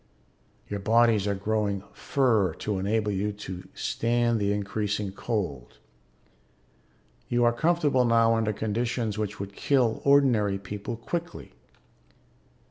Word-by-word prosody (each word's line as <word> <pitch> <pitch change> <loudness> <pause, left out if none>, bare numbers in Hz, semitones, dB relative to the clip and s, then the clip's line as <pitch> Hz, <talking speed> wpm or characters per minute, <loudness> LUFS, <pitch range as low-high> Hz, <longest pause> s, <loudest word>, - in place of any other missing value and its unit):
"Your 100 - -4
bodies 110 -1 +3
are 100 - 0
growing 100 -1 -1
fur 110 - +1
to 105 -3 -3
enable 105 +2 0
you 100 +2 -1
to 95 -3 -8
stand 120 0 0
the 100 0 +1
increasing 105 0 -2
cold. 95 - -4 1.5
You 120 0 +2
are 120 0 +4
comfortable 150 -2 +2
now 115 -1 +4
under 110 -1 +1
conditions 110 +1 -2
which 105 -1 -3
would 100 0 -6
kill 125 -1 +1
ordinary 125 -8 +4
people 100 +3 -6
quickly. 170 +9 -5
110 Hz, 120 wpm, -27 LUFS, 100-120 Hz, 1.5 s, are